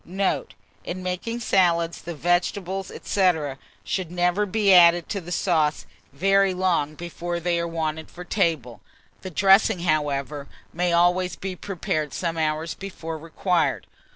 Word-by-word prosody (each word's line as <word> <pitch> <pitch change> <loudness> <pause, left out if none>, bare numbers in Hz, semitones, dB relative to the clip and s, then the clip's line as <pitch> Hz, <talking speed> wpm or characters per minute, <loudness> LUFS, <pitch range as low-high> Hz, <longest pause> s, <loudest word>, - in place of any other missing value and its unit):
Note. 190 +2 -2 0.3
In 185 +1 -5
making 185 +6 -3
salads, 170 -5 +2
the 170 -1 -6
vegetables, 180 +3 -1
&c., 190 -2 +3 0.5
should 185 -4 -3
never 180 +4 +1
be 200 0 +3
added 175 -1 +6
to 200 - -3
the 175 +1 -9
sauce 160 -5 +1 0.3
very 195 +5 +2
long 170 -5 0
before 175 +1 -5
they 170 0 0
are 170 - -1
wanted 160 -1 -3
for 180 - -9
table; 160 - -1 0.4
the 190 - -6
dressing, 190 0 +4
however, 145 -3 -1 0.3
may 175 +1 0
always 175 +2 +2
be 190 -1 -5
prepared 160 -6 -3
some 170 -2 -2
hours 155 +1 -1
before 165 -5 -7
required. 165 +2 0
175 Hz, 140 wpm, -24 LUFS, 160-185 Hz, 0.5 s, added